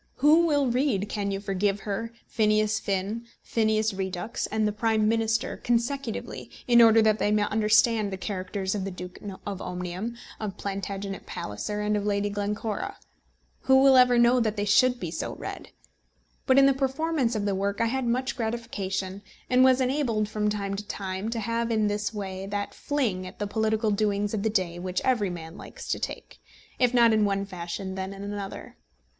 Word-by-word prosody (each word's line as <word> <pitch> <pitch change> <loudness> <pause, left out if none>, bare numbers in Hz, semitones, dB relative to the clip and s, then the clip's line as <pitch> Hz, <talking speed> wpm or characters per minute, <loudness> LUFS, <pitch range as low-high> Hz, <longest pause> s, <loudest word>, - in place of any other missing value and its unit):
Who 310 +5 +5
will 290 -3 +2
read 240 -5 +1
Can 205 -2 -2
You 195 0 -2
Forgive 195 0 -1
Her?, 220 +3 -3
Phineas 215 0 +2
Finn, 200 +4 -2 0.2
Phineas 220 -1 +1
Redux, 190 +2 -3
and 215 0 0
The - - 0
Prime 220 0 +1
Minister 225 0 0
consecutively, 240 0 -2 0.2
in 240 -1 +7
order 225 -1 +7
that 215 0 +3
they - - +2
may 210 0 +3
understand 215 0 +3
the 190 - -4
characters 190 0 -3
of 205 -2 -2
the 195 - -3
Duke 180 0 -8 0.3
of 200 -2 -4
Omnium, 180 +5 -4 0.2
of 210 -3 -4
Plantagenet 195 0 -5
Palliser, 105 - -4
and 210 0 +1
of 205 - -1
Lady 205 0 0
Glencora? 205 +1 -3 0.7
Who 265 0 +6
will 270 -1 +7
ever 250 -1 +6
know 240 +1 +5
that 220 -3 0
they 205 - 0
should 245 +4 +4
be - - -4
so - - -4
read? - - -7 0.8
But 260 - +5
in 275 - +8
the 275 - +5
performance 270 -1 0
of 205 -1 -1
the 200 - +1
work 200 +1 -1
I 230 - +3
had 260 +2 -1
much 255 +3 0
gratification, 205 -5 -3 0.3
and 255 +1 +6
was 260 0 +5
enabled 250 -5 +1
from 210 0 -1
time 200 -1 -2
to 210 +1 -7
time 190 +1 -4
to 230 0 -2
have 230 +2 -1
in 220 -2 +2
this 205 +1 -1
way 195 -2 -5
that 205 0 -3
fling 225 -11 -1
at - - -11
the 205 - -2
political 220 +1 0
doings 205 0 0
of 215 - -1
the 220 - +1
day 180 -5 -1
which 185 0 -2
every 235 -7 +2
man 165 -1 -7
likes - - -10
to - - 0
take, - - -6 0.4
if 250 -2 +4
not 235 -2 +5
in 215 -1 +3
one 200 -1 0
fashion 190 +1 -5
then 190 +1 -4
in 195 0 -8
another. 200 -1 -6
210 Hz, 190 wpm, -27 LUFS, 195-235 Hz, 0.8 s, in